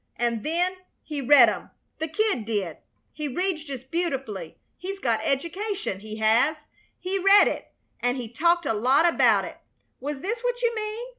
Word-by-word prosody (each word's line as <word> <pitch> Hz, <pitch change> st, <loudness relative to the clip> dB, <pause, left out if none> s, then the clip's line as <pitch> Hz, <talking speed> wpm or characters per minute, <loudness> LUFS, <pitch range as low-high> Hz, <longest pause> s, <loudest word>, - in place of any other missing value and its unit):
An' 235 Hz, -2 st, -1 dB
then 355 Hz, -, 0 dB, 0.3 s
he 295 Hz, -3 st, -4 dB
read 265 Hz, -2 st, +7 dB
'em 205 Hz, -5 st, -3 dB, 0.3 s
the 320 Hz, -, -1 dB
Kid 405 Hz, -, 0 dB
did. 200 Hz, -8 st, -2 dB, 0.4 s
He 300 Hz, -1 st, -4 dB
reads 340 Hz, +3 st, -2 dB
just 265 Hz, -3 st, -8 dB
beautiful. 270 Hz, -, -3 dB, 0.2 s
He's 390 Hz, +2 st, -6 dB
got 235 Hz, -, 0 dB
education, 335 Hz, -, -2 dB
he 215 Hz, +1 st, -8 dB
has. 240 Hz, +8 st, +2 dB, 0.3 s
He 375 Hz, +2 st, -2 dB
read 395 Hz, +2 st, +7 dB
it, -, -, -4 dB, 0.3 s
and 245 Hz, +2 st, 0 dB
he 245 Hz, -3 st, -5 dB
talked 340 Hz, +8 st, +1 dB
a 250 Hz, -, +1 dB
lot 260 Hz, +10 st, +3 dB
about 340 Hz, -, +4 dB
it. -, -, -10 dB, 0.4 s
Was 285 Hz, 0 st, -5 dB
this 455 Hz, +5 st, -2 dB
what -, -, -1 dB
you 475 Hz, 0 st, +2 dB
mean? 435 Hz, +2 st, -4 dB
300 Hz, 170 wpm, -25 LUFS, 235-370 Hz, 0.4 s, read